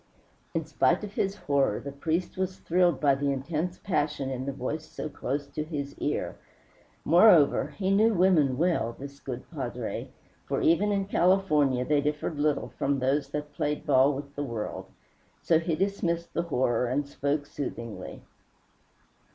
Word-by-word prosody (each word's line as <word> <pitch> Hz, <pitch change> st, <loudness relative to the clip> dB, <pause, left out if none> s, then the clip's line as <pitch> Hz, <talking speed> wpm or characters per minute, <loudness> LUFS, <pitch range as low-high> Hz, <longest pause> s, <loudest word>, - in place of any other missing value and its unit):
In -, -, 0 dB
spite -, -, +2 dB
of 205 Hz, -1 st, -6 dB
his 195 Hz, 0 st, -1 dB
horror 140 Hz, -, +1 dB
the 140 Hz, -, -6 dB
priest 160 Hz, +5 st, -2 dB
was 190 Hz, 0 st, -2 dB
thrilled 175 Hz, 0 st, +2 dB
by 145 Hz, -2 st, +4 dB
the 140 Hz, +1 st, 0 dB
intense 155 Hz, +6 st, -2 dB
passion 145 Hz, -6 st, -1 dB
in 130 Hz, +1 st, -4 dB
the -, -, 0 dB
voice 145 Hz, +4 st, -4 dB
so 155 Hz, -, -5 dB
close 140 Hz, 0 st, -3 dB
to 145 Hz, +2 st, -3 dB
his 145 Hz, -3 st, -5 dB
ear. -, -, -2 dB, 0.7 s
Moreover, 170 Hz, -3 st, +5 dB
he 190 Hz, -1 st, 0 dB
knew 215 Hz, +3 st, +5 dB
women 165 Hz, -8 st, +4 dB
well, 155 Hz, -9 st, +1 dB
this 140 Hz, +1 st, -9 dB
good 130 Hz, -2 st, -6 dB
padre, -, -, -4 dB, 0.4 s
for -, -, 0 dB
even 185 Hz, +6 st, +3 dB
in 200 Hz, -1 st, 0 dB
California 155 Hz, -10 st, +2 dB
they 150 Hz, 0 st, +2 dB
differed 150 Hz, +1 st, -2 dB
little 150 Hz, -1 st, +1 dB
from 140 Hz, 0 st, +1 dB
those 135 Hz, +2 st, 0 dB
that 150 Hz, 0 st, -5 dB
played 145 Hz, +1 st, -2 dB
ball 135 Hz, 0 st, +5 dB
with 140 Hz, +1 st, -7 dB
the 145 Hz, -, -2 dB
world. 115 Hz, -6 st, -5 dB, 0.6 s
So 160 Hz, -, +4 dB
he 165 Hz, -1 st, -1 dB
dismissed 170 Hz, -3 st, -1 dB
the -, -, +1 dB
horror 125 Hz, -3 st, +1 dB
and 140 Hz, +4 st, -1 dB
spoke 145 Hz, +1 st, -1 dB
soothingly. 120 Hz, -6 st, -6 dB
150 Hz, 160 wpm, -28 LUFS, 140-170 Hz, 0.7 s, Moreover